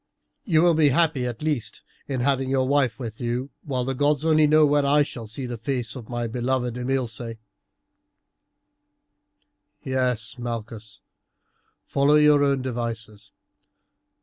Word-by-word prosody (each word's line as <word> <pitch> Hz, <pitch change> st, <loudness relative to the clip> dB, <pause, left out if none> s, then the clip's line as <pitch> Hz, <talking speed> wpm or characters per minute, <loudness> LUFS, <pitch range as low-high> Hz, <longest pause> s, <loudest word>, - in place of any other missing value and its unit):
You 165 Hz, -5 st, +3 dB
will 175 Hz, -1 st, +5 dB
be 155 Hz, -2 st, +4 dB
happy 140 Hz, -3 st, +2 dB
at 120 Hz, +2 st, -6 dB
least 150 Hz, -7 st, -2 dB, 0.2 s
in 130 Hz, -3 st, -2 dB
having 135 Hz, 0 st, +1 dB
your 130 Hz, -1 st, +1 dB
wife 140 Hz, -3 st, +1 dB
with 115 Hz, -3 st, -7 dB
you, 125 Hz, +3 st, -2 dB
while 130 Hz, -3 st, -2 dB
the 135 Hz, -, -1 dB
gods 145 Hz, +2 st, +1 dB
only 155 Hz, -1 st, +4 dB
know 155 Hz, +1 st, +5 dB
when 145 Hz, 0 st, +3 dB
I 145 Hz, +1 st, +4 dB
shall 120 Hz, -5 st, -8 dB
see 120 Hz, +5 st, -6 dB
the 120 Hz, -2 st, -6 dB
face 120 Hz, -1 st, -3 dB
of 120 Hz, -4 st, -9 dB
my 120 Hz, -1 st, -2 dB
beloved 125 Hz, +1 st, -1 dB
Imilce. 125 Hz, -3 st, -3 dB, 2.5 s
"Yes, 125 Hz, -2 st, -1 dB
Malchus, 115 Hz, -4 st, -6 dB, 0.8 s
follow 140 Hz, +2 st, +3 dB
your 150 Hz, -1 st, +5 dB
own 140 Hz, -2 st, +1 dB
devices. 115 Hz, -4 st, -5 dB
130 Hz, 140 wpm, -24 LUFS, 120-145 Hz, 2.5 s, will